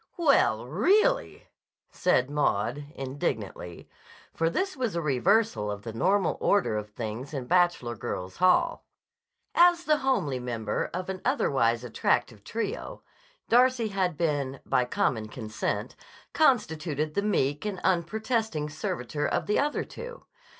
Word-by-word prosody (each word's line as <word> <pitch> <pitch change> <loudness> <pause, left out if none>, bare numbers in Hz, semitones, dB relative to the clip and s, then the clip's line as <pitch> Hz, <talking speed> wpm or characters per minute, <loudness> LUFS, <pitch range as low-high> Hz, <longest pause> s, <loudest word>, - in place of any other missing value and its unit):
"Well, 275 - +3
really!" 415 - +2 0.5
said 130 -8 +2
Maud 145 -1 0
indignantly, 110 -10 -4 0.5
for 165 0 +1
this 380 - -1
was 245 -8 -2
a - - +1
reversal 165 - +2
of 105 0 -5
the 115 - -6
normal 190 - +1
order 200 - +2
of 105 0 -4
things 115 +6 -6
in 130 -2 -4
Bachelor 175 -7 +2
Girls' 95 -3 -5
Hall. 325 - +3 0.7
As 345 0 +5
the 305 -3 +3
homely 200 - 0
member 115 -4 -3
of 185 +1 -4
an 190 -1 -4
otherwise 125 - +1
attractive 115 -2 0
trio, 230 - -4 0.4
Darcy 245 -1 +4
had 185 -5 -1
been, 140 -5 -1
by 125 - +2
common 115 -2 0
consent, 110 -1 -4 0.4
constituted 160 - +1
the 200 - +1
meek 145 -9 0
and 205 -3 -3
unprotesting 205 -3 0
servitor 145 -1 -3
of - - -1
the 210 - +1
other 295 +1 0
two. 485 +1 -10
160 Hz, 130 wpm, -27 LUFS, -, 0.7 s, As